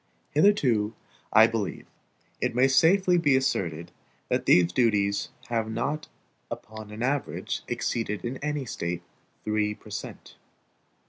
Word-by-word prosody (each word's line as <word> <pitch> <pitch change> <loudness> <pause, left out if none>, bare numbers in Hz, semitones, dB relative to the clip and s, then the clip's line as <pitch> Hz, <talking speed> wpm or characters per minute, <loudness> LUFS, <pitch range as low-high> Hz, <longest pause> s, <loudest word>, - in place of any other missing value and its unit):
Hitherto, 135 - +3 0.4
I 110 - +8
believe, 110 -5 -3 0.6
it - - 0
may 125 +2 +5
safely 175 +6 +4
be 145 -5 +3
asserted, 85 -11 -1 0.4
that - - 0
these 90 -1 +5
duties 100 -4 +2 0.2
have 115 -2 -1
not 135 +7 -2 0.4
upon 110 -1 -8
an 105 +2 -5
average 140 +2 -2
exceeded 110 -2 -2
in 125 +3 -3
any 150 -1 -3
State 85 -5 -4 0.4
three 105 -1 0
per - - -15
cent. - - -8
115 Hz, 125 wpm, -27 LUFS, 105-140 Hz, 0.6 s, I